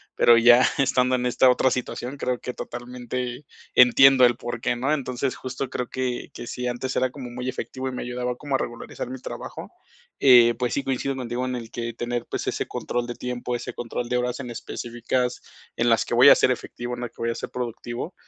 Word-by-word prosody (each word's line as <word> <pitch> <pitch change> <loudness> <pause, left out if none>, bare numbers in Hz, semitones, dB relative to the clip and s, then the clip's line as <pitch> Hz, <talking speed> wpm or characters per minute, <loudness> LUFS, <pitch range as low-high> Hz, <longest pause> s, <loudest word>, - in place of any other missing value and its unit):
pero, 120 - +6
ya 120 +2 +7
estando 130 -2 +2
en 125 0 -1
esta 125 +1 +4
otra 130 +1 +3
situación, 125 +1 -4
creo 125 -2 -2
que 125 - -5
totalmente 125 +2 -5 0.3
entiendo 130 +1 +7
el 120 -1 +3
por 120 -1 -6
qué, - - 0
¿no? 135 +5 0
Entonces, 130 -2 -2
justo 130 0 -5
creo 125 - -3
que 130 -1 -3
que 120 - -8
si 125 0 -4
antes 125 +2 -3
era 130 0 +1
como 130 -3 -8
muy 125 +1 -6
efectivo 130 0 -5
y - - -2
me 125 - -5
ayudaba 125 0 -3
como 140 +1 -3
a - - +4
regularizar 120 0 -6
mi 130 0 -6
trabajo, - - -7 0.5
eh, 120 -3 +7
pues 125 -1 -1
sí, 140 - -1
coincido 135 +1 -2
contigo 125 0 -3
en 125 - -2
el 115 -2 -6
que 115 -1 -4
tener 120 0 -3
pues - - -4
ese - - -2
control 120 0 -3
de 120 - -5
tiempo, 125 0 -4
ese 120 - -5
control 120 0 -4
de 125 - +1
horas 125 +1 -2
en 125 -3 -6
específicas 120 +2 -3 0.3
en 120 - +2
las 115 -4 +3
que - - -4
voy - - +8
a - - +9
ser - - +3
efectivo, 120 0 -5
en 120 - -8
las 120 - -4
que - - -38
voy 115 - 0
a - - -4
ser - - -5
productivo, 120 +5 -5
125 Hz, 225 wpm, -24 LUFS, 120-130 Hz, 0.5 s, a